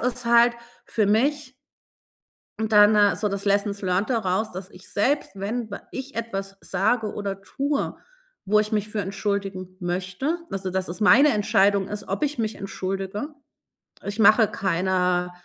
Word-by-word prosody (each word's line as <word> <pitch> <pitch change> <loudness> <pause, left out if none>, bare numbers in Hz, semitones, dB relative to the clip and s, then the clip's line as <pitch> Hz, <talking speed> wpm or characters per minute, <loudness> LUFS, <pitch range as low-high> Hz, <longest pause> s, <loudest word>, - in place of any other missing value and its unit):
ist 245 0 -2
halt 235 0 +5 0.3
für 215 -3 0
mich 265 +6 +1 1.1
Und 220 0 -2
dann, 210 0 +7
äh, 205 -1 +4
so 210 - -1
das 200 0 -4
lessons 200 0 0
learned 190 +4 0
daraus, 215 -2 0
dass 185 +1 -8
ich 180 0 -15
selbst, 265 +6 0
wenn 215 +4 -4
w 200 - -4
ich 270 +1 -7
etwas 195 -4 -4
sage 220 -2 0
oder 195 -1 -4
tue, 280 +8 -2 0.5
wo 210 +2 +3
ich 215 0 0
mich 210 -1 0
für 210 0 -3
entschuldigen 195 -1 -3
möchte, 185 - -2
also, 190 -1 -3
dass 185 0 -2
es 175 +5 -6
meine 270 +8 +6
Entscheidung 200 -2 +2
ist, 210 -1 -6
ob 195 +7 -3
ich 295 -2 -1
mich 220 -1 -2
entschuldige. 195 +4 -4 0.8
Ich 205 +2 -5
mache 220 +1 +6
keine 180 -1 0
205 Hz, 160 wpm, -24 LUFS, 195-225 Hz, 1.1 s, dann